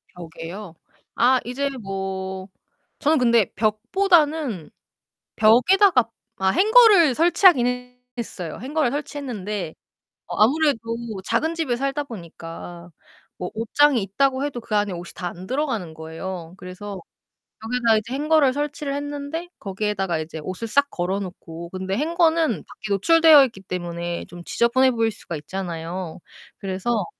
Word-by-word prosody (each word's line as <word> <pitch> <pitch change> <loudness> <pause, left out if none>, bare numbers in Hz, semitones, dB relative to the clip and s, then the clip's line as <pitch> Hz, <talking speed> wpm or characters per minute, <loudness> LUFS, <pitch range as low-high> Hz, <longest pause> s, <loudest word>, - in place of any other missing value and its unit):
벽에요. 170 +2 -8 0.4
아 255 +2 +4
이제 275 +3 -2
뭐 190 -1 -4 0.5
저는 310 +2 +3
근데 235 -5 +3
벽보다는 290 - +1 0.7
벽에다가 250 - +5 0.3
아 190 0 +1
행거를 410 - +6
설치하기는 250 -8 +3 0.2
했어요. 180 -8 -5
행거를 285 -1 0
설치했는데 215 - -4 0.5
어 - - -5
아무래도 285 +2 +3 0.5
작은 315 +9 0
집에 295 -8 -1
살다 275 +2 -2
보니까 170 - -9 0.5
뭐 180 - -4
옷장이 240 +2 +3
있다고 265 +7 0
해도 260 -4 -4
그 215 -2 -2
안에 205 -2 +1
옷이 175 0 -7
다 180 -2 -4
안 180 +2 -10
들어가는 235 - -2
거예요. 165 +2 -7
그래서 185 +1 -8 0.6
벽에다 230 -1 +2
이제 220 +4 -4
행거를 295 -2 +3
설치를 290 -1 -3
했는데 290 +4 -5
거기에다가 195 -4 -2
이제 160 0 -6
옷을 185 +5 -5
싹 280 +5 +2
걸어 185 +3 -2
놓고 170 -3 -8
근데 190 +2 -3
행거는 325 +1 +2 0.2
밖에 215 -2 -9
노출되어 315 - +7
있기 225 -6 -9
때문에 175 -2 -4
좀 175 0 -11
지저분해 260 +2 +3
보일 225 -1 +1
수가 175 -5 -8
있잖아요. 175 0 -5 0.4
그래서 195 +2 -1
225 Hz, 305 characters per minute, -23 LUFS, 185-285 Hz, 0.7 s, 노출되어